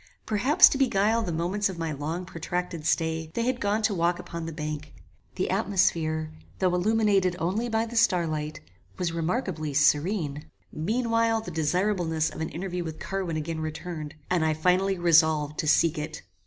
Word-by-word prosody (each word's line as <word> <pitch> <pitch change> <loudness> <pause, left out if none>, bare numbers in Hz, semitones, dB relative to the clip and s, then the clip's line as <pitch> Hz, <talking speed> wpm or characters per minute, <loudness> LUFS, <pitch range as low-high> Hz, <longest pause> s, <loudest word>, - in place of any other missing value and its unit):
Perhaps 250 - +6
to 275 - -2
beguile 225 -3 +2
the 180 - -3
moments 180 +5 0
of 185 - -6
my 165 -1 -2
long 155 +5 -4
protracted 170 -1 -4
stay, 160 -1 0
they 235 - 0
had 250 +1 -1
gone 205 +2 0
to 215 - +2
walk 175 -1 +1
upon 170 -1 -6
the - - -4
bank. 150 -1 -5 0.4
The 185 - -1
atmosphere, 165 -6 +1 0.3
though 185 -2 +1
illuminated 200 -1 +2
only 195 +9 -1
by 225 0 +1
the 235 +1 -8
star 180 -7 +3
light, 155 -1 -4 0.4
was 180 -3 -1
remarkably 165 - -2
serene. 150 +1 +1 0.2
Meanwhile 230 +5 +1
the 220 - -7
desirableness 165 0 0
of - - -7
an 160 - -2
interview 180 +1 -4
with 160 -2 -6
Carwin 190 -4 -3
again 160 +1 -3
returned, 155 -1 -5
and 180 -3 +1
I 155 -1 +1
finally 185 +4 +2
resolved 160 -3 +3
to 155 - -1
seek 160 +1 +3
it. 155 +1 -6
175 Hz, 170 wpm, -27 LUFS, 155-200 Hz, 0.4 s, Perhaps